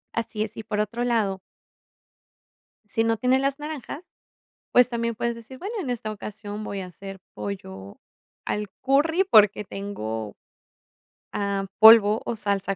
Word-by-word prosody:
Así 220 -1 -2
es, 215 - -7
y 220 - -5
por 210 0 -3
otro 220 +3 -1
lado. 210 -6 0 1.5
Sí 225 +2 0
no 225 -1 +1
tienes 255 +2 +2
las 275 +1 -1
naranjas, 300 +1 -6 0.7
pues 250 -1 +6
también 235 -1 -2
puedes 235 +1 -1
decir, 230 +3 -11
bueno, 410 +5 -5
en 260 - -3
esta 215 -3 -3
ocasión 210 0 -7
voy 200 -2 -4
a 185 - -6
hacer 195 +2 -10 0.2
pollo 100 - -7 0.5
al 210 0 -2 0.2
curry 320 +7 +3
porque 210 - +5
tengo, 115 - -5 1.0
am, 200 -1 -2
polvo 220 -1 +8
o 235 - -2
salsa 200 -2 -1
215 Hz, 145 wpm, -25 LUFS, 200-240 Hz, 1.5 s, polvo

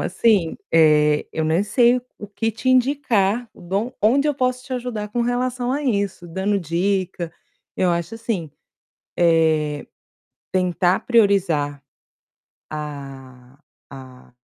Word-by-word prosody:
assim, 190 -3 +1 0.2
eh, 150 -2 +4
eu 160 - -1
nem 160 +4 +2
sei 240 +3 +4
o 250 - -4 0.2
o 205 - -6
que 225 +3 -2
te 230 +4 -4
indicar, 245 -4 +2
bom, 200 +8 -3
onde 265 +7 +3
eu 295 - +1
posso 255 -1 -1
te 260 - -8
ajudar 240 -4 -4
com 240 +3 -2
relação 245 +1 -1
a 290 +2 -2
isso, 200 -7 -1
dando 190 +4 -1
dica. 180 0 -2 0.4
Eu 185 - +2
acho 170 +6 -3
assim, 215 -9 -3 0.7
eh, 160 -3 +2 0.7
tentar 180 +1 +1
priorizar, 185 - +2 0.9
a 135 -4 -9 0.3
a 130 -2 -13
190 Hz, 125 wpm, -21 LUFS, 160-235 Hz, 0.9 s, eh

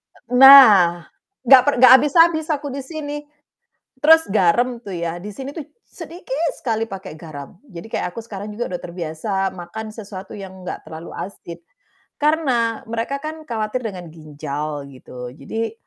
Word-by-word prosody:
E 250 - -13
nah, 210 - +8 0.4
gak 265 -1 +9
per 285 - +2
gak 255 - +9
habis-habis 315 +2 +3
aku 290 -1 -3
di 275 +1 -5
sini. 295 0 -6 0.8
Terus 320 -1 +5
garam 220 +6 +2
tuh 205 -5 -9
ya 170 -1 -4
di 205 +4 -9
sini 270 +5 -7
tuh 310 - -6 0.2
sedikit 330 -2 -5
sekali 225 -2 -2
pakai 190 -6 -9
garam, 150 -2 -10
jadi 195 -4 -11
kayak - - -3
aku 230 - -6
sekarang 210 -2 -8
juga 240 -1 -4
udah 180 - -4
terbiasa 175 +4 -4
makan 190 +5 -8
sesuatu 200 -3 -9
yang 190 -1 -10
nggak 180 - -7
terlalu 160 +1 -9
asin, 170 -3 -8 0.6
karena 265 -7 0
mereka 230 +5 -3
kan 315 +1 -6
khawatir 220 +1 -3
dengan 185 -5 -6
ginjal 150 -2 -6
gitu. 125 -2 -10
Jadi, 220 +11 -5
215 Hz, 155 wpm, -20 LUFS, 175-270 Hz, 0.8 s, gak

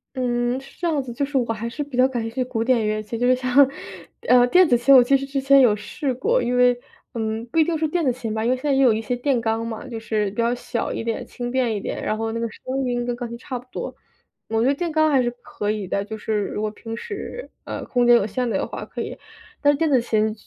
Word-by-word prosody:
嗯， 245 0 0
是 270 0 -16
这 345 - 0
样 305 -4 +1
子， 245 - -7
就 280 +4 -1
是 275 -1 -2
我 235 -2 0
还 230 +2 -4
是 295 +6 -4
比 285 -3 -9
较 255 +1 +5
感 250 -3 -3
兴 225 - -4
趣 255 +1 -1
古 240 -3 -2
典 235 -3 +2
乐 215 0 0
器。 225 +2 -5
就 245 - +2
是 255 - +5
像， 255 +2 +4 0.6
呃， 245 0 +6
电 360 +5 +6
子 245 - +4
琴， 260 +3 +6
我 250 - +9
其 275 +3 +3
实 275 0 0
之 275 0 -2
前 275 +1 +5
有 225 -5 +5
试 210 +6 -3
过， 470 - +1
因 245 +1 0
为， 245 0 +4 0.3
嗯， 220 0 -3
不 325 - +1
一 - - +7
定 325 +1 -1
是 315 0 0
电 340 +2 -1
子 255 - +3
琴 235 -3 -4
吧， 220 0 -2
因 235 - +1
为 255 - +3
现 255 - -14
在 290 -2 +2
也 270 - +3
有 250 -4 +6
一 220 - -2
些 235 +3 -2
电 250 +1 0
钢 225 0 -1
嘛， 225 +3 -6
就 230 -3 -6
是 215 -2 -1
比 210 - -15
较 235 +1 +2
小 235 -1 -3
一 - - -3
点， 230 -1 -3
轻 245 0 -5
便 250 -3 +1
一 205 - -2
点， - - -4
然 215 - -1
后 225 0 -2
那 230 - -3
个 230 - -1
声 260 +5 -4
音 245 -1 -1
跟 245 -1 -2
钢 240 -1 -5
琴 235 - -7
差 250 +1 -5
不 245 - -17
多。 - - -5 0.5
我 225 0 +1
觉 - - +3
得 275 - +4
电 340 +4 -2
钢 310 0 +3
还 270 -2 +4
是 240 - +1
可 295 -9 -4
以 210 -2 -2
的， 200 +2 -1
就 220 0 -6
是 220 - -3
如 - - -4
果 215 0 -1
平 225 +1 -7
时， 425 - -7 0.2
呃， - - -5
空 245 -1 +1
间 240 - +8
有 205 - +3
限 245 +4 -2
的 195 - 0
话 - - -7
可 - - -6
以。 - - -5 0.4
但 290 - +5
是 280 - -2
电 325 -1 +1
子 260 -4 +4
琴， 220 -2 +1
245 Hz, 320 characters per minute, -23 LUFS, 225-270 Hz, 0.6 s, 我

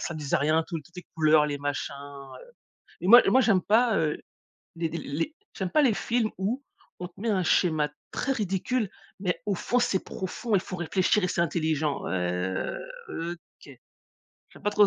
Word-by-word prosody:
ça 170 - -3
disait 150 -3 0
rien, 155 +3 +2
tout 170 - -3
toutes 175 - -21
les 180 - -6
couleurs, 155 -1 +5
les 145 -1 -3
machins, 145 0 -3
heu. 140 - -10 0.6
Et 180 - -2
moi 240 +5 +9
et - - +4
moi, 260 - +5
j'aime 210 -7 +4
pas, 225 +2 +3
heu, 155 -2 +1 0.6
les 165 -1 -1
d 170 - -4
les 165 - -3 0.2
j'aime 190 -2 -3
pas 305 - +4
les 255 -6 +4
films 235 -2 0
où 220 +9 -2 0.4
on 180 - -4
te 175 - -20
met 225 +3 -1
un 190 -4 +2
schéma 155 -3 +2 0.2
très 270 - -1
ridicule, 210 +1 -1 0.3
mais 180 -2 -1
au 200 - +1
fond 245 +7 +1
c'est 200 -6 +1
profond 205 +4 -2
et 190 - +4
faut 185 - -6
réfléchir 185 +3 +1
et - - +2
c'est 175 - 0
intelligent. 155 -3 0
Ouais, - - -3 1.0
heu, 170 +1 -3
OK. 170 - -17 0.8
J'aime - - -16
pas 210 - +1
trop 210 0 +5
180 Hz, 200 wpm, -27 LUFS, 155-215 Hz, 1.0 s, moi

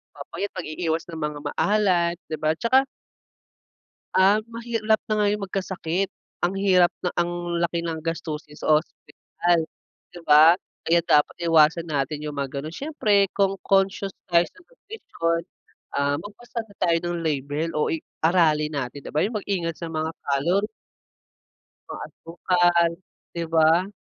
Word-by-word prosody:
papayat 200 - -5
pag-iiwas 165 -1 -3
ng 165 -2 -7
mga 150 -1 -3
maalat 185 -5 +2
di 155 - -3
ba 155 0 +2
at 160 - -15
saka 260 +3 +4 1.3
Um, 200 +3 +5
mahirap 225 -2 0
na 215 -1 +1
ngayon 205 +1 +1
magkasakit, 190 -1 -2 0.3
ang 175 - +3
hirap 185 -2 +4
na 180 - -3
ang 175 0 -1
laki 170 0 0
ng 165 -2 -4
gastusin 155 -2 -5
sa - - -5
ospital 170 +1 -1 0.5
di 175 - -10
ba? 155 +2 +8 0.3
Kaya 170 +1 +3
dapat 150 0 +3
iwasan 165 +1 +4
natin 145 0 -2
yung 150 -1 -5
mga 140 0 -3
ganun. 155 +4 -7
Siyempre 210 -10 +1
kung 195 -1 +1
conscious 195 0 +1 0.2
tayo 170 -1 +4
sa - - -14
nutrisyon, 405 - -3 0.5
ah, 140 0 +1
magbasa 230 +4 -8
na 200 - -19
tayo 170 -2 +3
ng 175 0 -2
label 145 +1 -1
o 150 - +2
i-aralin 160 -2 +1
natin 140 0 -4
di - - -7
ba 150 - +3
yung 215 +2 -1
mag-ingat 175 -5 -2
sa 170 - -5
mga 160 0 -2
calorie 170 +9 +1 1.2
mga - - -6
asukal 175 0 +1 0.4
di 170 -1 -3
ba? 165 +5 +4
170 Hz, 145 wpm, -24 LUFS, 155-195 Hz, 1.3 s, ba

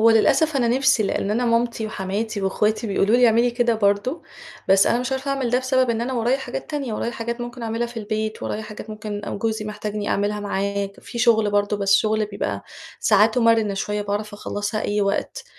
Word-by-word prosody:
هو 230 +1 +6
للأسف 280 +7 +3
أنا 240 -3 +2
نِفْسي، 260 -2 +3
لأن 200 0 -1
أنا 235 +3 +1
مامتي 230 -1 +1
وحماتي 205 +1 -3
واخواتي 210 +4 0
بيقولوا 200 +3 +2
لي 245 0 +6
اعملي 235 +2 +3
كده 240 -1 +1
برضو، 205 +7 0 0.5
بس 195 +1 +5
أنا 235 - +2
مش 255 +2 -3
عارفة 265 +1 -2
أعمل 270 -3 -1
ده 250 - +3
بسبب 260 -1 +1
إن 225 - -1
أنا 250 +3 -2
ورايا 245 +2 +1
حاجات 270 - -6
تانية، 280 -6 -3
ورايا 235 - -2
حاجات 235 +1 -4
ممكن 240 0 -6
أعملها 230 +1 -1
في 235 0 -12
البيت، 215 0 -3
ورايا 215 - -3
حاجات 215 0 -9
ممكن 210 -1 -5
أو - - -4
جوزي 220 0 -2
محتاجني 210 0 -4
أعملها 205 +1 0
معاه 200 0 -1
ك 200 - -16
في 235 - -8
شغل 220 -3 +4
برضو، 205 0 +1
بس 195 -1 +3
شغل 215 0 +1
بيبقى 205 0 -4 0.4
ساعاته 220 +3 +4
مرنه 225 -3 +3
شوية، 205 +1 -2
باعرف 205 +1 -3
أخلّصها 205 +1 -3
أي 210 0 0
وقت، 200 0 -1
220 Hz, 210 wpm, -22 LUFS, 205-240 Hz, 0.5 s, هو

